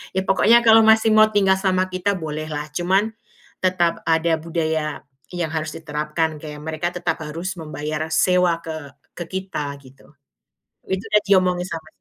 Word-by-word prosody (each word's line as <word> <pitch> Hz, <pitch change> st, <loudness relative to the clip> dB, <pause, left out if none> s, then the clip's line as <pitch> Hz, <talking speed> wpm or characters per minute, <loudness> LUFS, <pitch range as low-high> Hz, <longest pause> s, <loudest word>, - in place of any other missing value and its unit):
Ya 190 Hz, -, +2 dB
pokoknya, 230 Hz, +5 st, +4 dB
kalau 225 Hz, 0 st, +8 dB
masih 220 Hz, 0 st, +5 dB
mau 215 Hz, 0 st, +7 dB
tinggal 195 Hz, -2 st, +2 dB
sama 185 Hz, -1 st, +2 dB
kita, 195 Hz, +2 st, 0 dB
boleh 155 Hz, -1 st, -5 dB
lah. 150 Hz, 0 st, -5 dB
Cuman, 190 Hz, +6 st, +1 dB, 0.5 s
tetap 175 Hz, -2 st, +1 dB
ada 160 Hz, 0 st, +2 dB
budaya 160 Hz, -2 st, -2 dB, 0.3 s
yang 175 Hz, -2 st, -2 dB
harus 155 Hz, -1 st, -3 dB
diterapkan. 155 Hz, +1 st, -2 dB
Kayak, 150 Hz, -1 st, -8 dB
mereka 160 Hz, +2 st, -3 dB
tetap 175 Hz, 0 st, -1 dB
harus 170 Hz, +5 st, -5 dB
membayar 155 Hz, 0 st, -4 dB
sewa 180 Hz, -1 st, +3 dB
ke 155 Hz, -4 st, -7 dB, 0.3 s
ke 175 Hz, -, -3 dB
kita 185 Hz, -7 st, -4 dB
gitu. 130 Hz, +1 st, -18 dB, 0.8 s
Itu 190 Hz, 0 st, -1 dB
udah 210 Hz, 0 st, +4 dB
diomongin 180 Hz, -2 st, +3 dB
sama 160 Hz, -1 st, -6 dB
170 Hz, 155 wpm, -21 LUFS, 155-190 Hz, 0.8 s, kalau